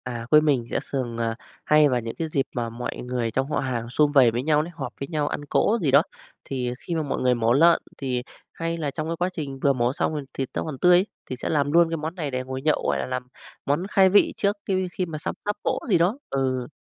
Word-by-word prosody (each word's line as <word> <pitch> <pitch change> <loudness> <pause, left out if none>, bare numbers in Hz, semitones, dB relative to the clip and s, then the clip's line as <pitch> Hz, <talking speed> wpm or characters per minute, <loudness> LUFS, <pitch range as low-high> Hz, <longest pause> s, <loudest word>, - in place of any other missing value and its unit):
À, 120 -2 -5
quê 150 0 +8
mình 140 -6 +1
sẽ - - +1
thường, 125 -4 -4
à, 115 -1 -1 0.3
hay 150 -1 +5
vào 125 -2 +1
những 115 0 -6
cái 165 - -3
dịp 140 -3 0
mà 120 -2 -1
mọi 120 +2 -5
người 125 -2 -2
trong 135 +5 -1
họ - - +1
hàng 120 -3 -3
sum 145 +3 +2
vầy 130 -5 +6
với 120 +2 -2
nhau 150 0 +3
đấy, 165 +3 -6
họp - - -5
với 140 - -4
nhau 150 -3 -1
ăn 145 - -4
cỗ 210 +9 +2
gì 145 -5 +1
đó, 140 +2 +7 0.4
thì 125 -2 -2
khi 170 - -4
mà 160 - 0
mọi 145 - -2
người 125 -1 +3
mổ 115 0 +2
lợn 165 +5 +5 0.2
thì 130 -3 -2 0.3
hay 165 0 -3
là 150 -4 -2
trong 155 +2 -4
cái 165 - -2
quá 180 +2 0
trình 140 -6 -5
vừa 140 0 +3
mổ 120 0 0
xong 155 - -1
thì 145 - -4
thịt 135 -1 -3
nó - - -2
còn 155 -4 -5
tươi 180 0 +6
ấy, 185 - +2 0.2
thì 130 - -5
sẽ - - -4
làm 145 -2 +1
luôn 170 +1 +5
cái 165 - -2
món 160 +2 -4
này 155 -6 -3
để 130 0 -2
ngồi 130 0 -5
nhậu, 155 +2 +1
gọi - - +1
là, - - -2
làm 130 0 -4 0.4
món 145 +5 +1
khai 195 -2 +5
vị 205 +2 +4
trước 200 +1 +1
qui 185 -1 0
khi 185 - -2
mà 160 -3 -6
sắp 150 - -4
sắp 205 0 0
cỗ - - 0
gì 185 - +5
đó 180 +9 +2
ừ, 130 -2 -1
145 Hz, 280 wpm, -24 LUFS, 125-165 Hz, 0.4 s, quê